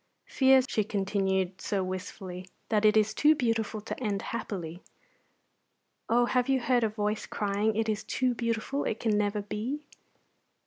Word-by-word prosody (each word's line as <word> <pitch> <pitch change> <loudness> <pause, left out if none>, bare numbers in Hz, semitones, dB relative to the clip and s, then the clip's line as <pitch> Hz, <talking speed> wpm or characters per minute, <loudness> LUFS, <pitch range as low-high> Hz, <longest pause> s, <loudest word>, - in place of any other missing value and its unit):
Fears," 265 -1 +4
she 220 -4 +1
continued, 195 -2 -1
so 200 -3 -1
wistfully, 185 0 -6 0.2
"that 215 -1 +2
it 215 0 +5
is 215 0 +3
too 300 +6 +5
beautiful 225 -4 -1
to 230 - -6
end 200 -3 -1
happily? 185 -7 -5 1.3
Oh, 240 +1 +4
have 250 +1 +1
you 265 -1 +3
heard 245 -1 +2
a 220 - +2
voice 210 0 -2
crying, 205 +1 0
'It 225 0 0
is 215 -1 -1
too 255 -1 0
beautiful; 230 +4 -2
it 220 - -2
can 220 -2 +1
never 205 0 0
be'?" 235 +9 -4
215 Hz, 160 wpm, -29 LUFS, 200-235 Hz, 1.3 s, it